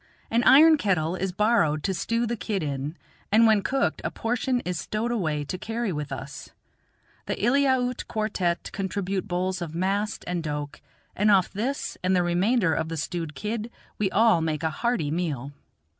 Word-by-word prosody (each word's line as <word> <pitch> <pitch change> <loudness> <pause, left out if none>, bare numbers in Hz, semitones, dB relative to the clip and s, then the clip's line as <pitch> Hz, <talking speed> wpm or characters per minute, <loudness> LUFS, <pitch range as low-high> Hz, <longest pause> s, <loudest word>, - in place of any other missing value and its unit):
An 235 +1 +2
iron 310 +3 +8
kettle 180 - +1
is 190 0 -2
borrowed 195 -7 +2
to 195 - 0
stew 230 +6 -1
the 235 +1 -2
kid 195 -2 -3
in, 145 +2 -4 0.3
and 225 +2 +6
when 215 -2 +5
cooked 270 +6 0
a - - -1
portion 245 +2 -1
is 180 -1 -3
stowed 225 +3 -2
away 155 -10 -1
to 180 +6 -5
carry 225 0 -2
with 150 -1 -4
us. - - -7 0.8
The - - -1
Eliaute 255 +1 +1
quartette 200 -6 -1
contribute 195 -1 -3
bowls 185 0 -1
of 165 -2 -5
mast 195 +4 -1
and 175 -1 -2
doke, 150 -2 -5 0.3
and 210 +2 +2
off 195 -3 +4
this 250 +8 -3
and 185 +1 +2
the 180 - +3
remainder 180 +2 +2
of 160 0 -1
the 165 - -4
stewed 160 0 -4
kid 215 +6 -3 0.3
we 205 -2 +1
all 220 -4 +4
make 160 -1 -2
a 160 - +1
hearty 220 -5 -1
meal. 150 -5 -2
190 Hz, 175 wpm, -26 LUFS, 165-225 Hz, 0.8 s, iron